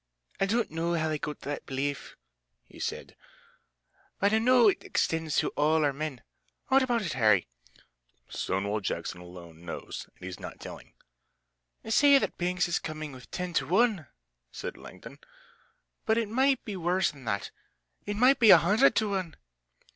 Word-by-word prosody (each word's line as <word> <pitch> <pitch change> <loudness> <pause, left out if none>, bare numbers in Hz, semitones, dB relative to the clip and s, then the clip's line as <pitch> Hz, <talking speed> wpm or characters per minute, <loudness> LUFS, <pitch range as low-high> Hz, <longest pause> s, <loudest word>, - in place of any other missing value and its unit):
"I 195 - +2
don't 230 -1 0
know 165 +2 -1
how 160 -1 0
they 155 -1 -2
got 150 +1 -5
that 145 +1 -5
belief," 140 +1 -3 0.5
he - - -16
said, - - -5 1.0
"but 200 +2 +2
I 220 - +4
know 245 0 +5
it 200 - +1
extends 160 -2 -1
to - - +2
all 155 +1 +2
our 140 - +1
men. 140 -5 -5 0.5
What 270 +1 +5
about 240 -4 0
it, 170 - -3
Harry?" 105 - +3 0.8
"Stonewall 100 +3 -2
Jackson 90 -2 -4
alone 85 -2 -12
knows, 85 - -7
and 90 - -12
he's 95 -1 -7
not - - -9
telling." - - -11 0.9
"They 220 - -6
say 280 +4 +6
that - - -2
Banks 180 0 0
is 175 - 0
coming 155 -1 -6
with 130 -2 -13
ten 180 -1 -4
to 135 -5 0
one!" 195 - +2 0.4
said - - -6
Langdon, - - -12 0.9
"but 220 - +3
it 225 -3 0
might 265 +3 +2
be 210 - -5
worse 180 +1 +1
than 140 -3 -15
that. 100 -2 -2 0.6
It 205 - -2
might 255 +5 +4
be 225 -3 +6
a - - +11
hundred 170 -3 +4
to 215 -1 +1
one." 185 -4 -3
165 Hz, 170 wpm, -28 LUFS, 135-215 Hz, 1.0 s, a